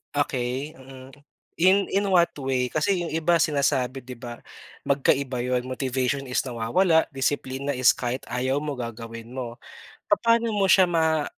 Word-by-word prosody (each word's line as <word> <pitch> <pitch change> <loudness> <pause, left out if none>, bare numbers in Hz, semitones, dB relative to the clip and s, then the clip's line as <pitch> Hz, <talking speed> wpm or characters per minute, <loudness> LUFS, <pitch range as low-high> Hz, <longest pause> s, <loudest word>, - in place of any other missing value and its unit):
Okey, 135 +2 -2
mm. 130 0 -12 0.5
In 190 +3 +4
in 200 +1 +1
what 175 -2 +4
way? 130 -2 -1
Kasi 175 +6 0
'yung 170 - -3
iba 165 +2 +2
sinasabi 135 -4 +1
'di 125 +1 -9
ba, 120 0 -9 0.4
magkaiba 135 -1 +1
'yon. 125 0 -1
Motivation 130 +1 -2
is 125 - +1
nawawala. 135 +8 +2
Disiplina 135 +1 -2
is 130 -2 +4
kahit 125 +1 -3
ayaw 130 +3 -1
mo, 150 -1 -3
gagawin 115 -1 -7
mo. 120 -2 -6 0.5
Papaano 230 +3 +3
mo 200 -2 +2
siya 190 -1 +7
ma 160 -3 +1
135 Hz, 145 wpm, -25 LUFS, 125-160 Hz, 0.5 s, siya